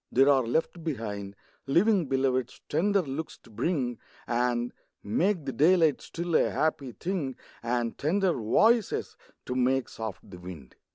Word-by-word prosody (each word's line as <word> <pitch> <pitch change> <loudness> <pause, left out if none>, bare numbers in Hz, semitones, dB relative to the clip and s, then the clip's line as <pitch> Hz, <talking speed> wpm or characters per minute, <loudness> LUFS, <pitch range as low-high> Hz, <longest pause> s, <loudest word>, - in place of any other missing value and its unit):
there 135 +3 +5
are 135 -2 +5
left 160 +6 -1
behind 105 -9 -4 0.3
Living 180 +3 +3
Beloveds, 130 -2 0
tender 195 +5 +2
looks 150 +2 -5
to 115 - -20
bring, 125 - -1 0.3
And 120 0 0 0.3
make 170 - +1
the 135 - -2
daylight 160 0 +4
still 170 0 -5
a - - +4
happy 140 -5 -1
thing, 165 -8 -3 0.3
And 120 0 -1
tender 180 +4 +2
voices, 215 - +2 0.3
to - - -3
make 130 +1 +1
soft 110 -4 -7
the 90 -3 -11
wind. 85 -8 -10
135 Hz, 145 wpm, -28 LUFS, 120-165 Hz, 0.3 s, there